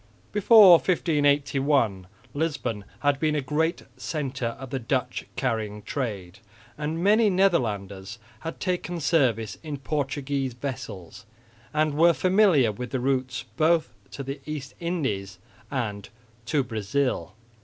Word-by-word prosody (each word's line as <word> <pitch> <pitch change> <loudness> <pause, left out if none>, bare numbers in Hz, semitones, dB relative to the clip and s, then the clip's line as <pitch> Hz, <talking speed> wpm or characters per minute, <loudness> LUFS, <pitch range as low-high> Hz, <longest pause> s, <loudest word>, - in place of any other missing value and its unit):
Before 210 -1 +8
1581 140 - +1 0.3
Lisbon 135 -9 -2 0.2
had 145 -1 +2
been 155 0 +1
a - - +1
great 155 +5 -1
centre 135 -6 -3
of 135 -2 -9
the 135 - -1
Dutch 125 +2 -2
carrying 110 -5 -2
trade; 100 -9 -4 0.4
and 155 +3 -3
many 215 +2 +5
Netherlanders 110 - 0 0.2
had 165 0 -6
taken 180 -2 -2
service 130 -9 +1
in 150 -3 -5
Portuguese 140 -2 -2
vessels 110 -9 -7 0.4
and 155 0 +1
were 170 +3 +5
familiar 180 - +4
with 125 +4 -6
the 130 - -2
routes 130 0 -1
both 160 -2 +2 0.2
to 140 - -7
the 135 +1 -6
East 145 -4 -5
Indies 110 - -2 0.3
and 110 -7 -3 0.4
to 145 -3 +2
Brazil. 110 -4 -2
140 Hz, 120 wpm, -26 LUFS, 115-155 Hz, 0.4 s, Before